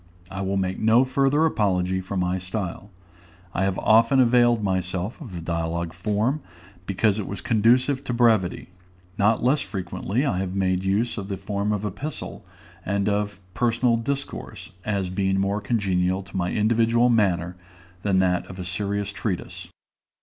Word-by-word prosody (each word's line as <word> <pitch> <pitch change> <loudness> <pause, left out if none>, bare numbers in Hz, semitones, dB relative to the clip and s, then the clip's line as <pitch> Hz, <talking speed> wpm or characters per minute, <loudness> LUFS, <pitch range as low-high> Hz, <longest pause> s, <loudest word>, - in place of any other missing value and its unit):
I 95 0 -4
will 95 0 -1
make 95 -1 -1
no 115 +4 +4
further 135 +4 +2
apology 95 - +1
for 95 +1 -5
my 90 0 0
style. 95 +1 -5 0.6
I 95 - +1
have 95 -2 -1
often 115 +4 +4
availed 120 -2 +4
myself 95 - -2
of 115 - -8
the 85 - -5
dialogue 85 0 -2
form, 105 +10 0 0.5
because 100 +2 +1
it 100 - -4
was 100 - -5
conducive 125 +6 +2
to - - -2
brevity; 115 -9 +2 0.5
not 110 +3 +3
less 140 +4 +3
frequently 100 +5 -2
I 95 -10 0
have 95 0 -3
made 95 -1 +1
use 105 +4 0
of 95 - -6
the 100 -1 -3
form 100 +1 -2
of 105 -1 -1
the 105 - -1
epistle 140 +9 -7 0.4
and 100 +1 -1
of 105 0 -1
personal 120 +1 +2
discourse, 140 +5 -5
as 100 -4 -1
being 95 0 +1
more 100 +2 0
congenial 95 -3 0
to 95 - -14
my 90 -1 0
individual 115 +2 +3
manner 90 -6 +1 0.5
than 100 -1 +1
that 90 -1 +1
of 95 - -9
a 90 - -5
serious 100 +2 -2
treatise. 95 -5 -4
100 Hz, 165 wpm, -24 LUFS, 95-115 Hz, 0.6 s, no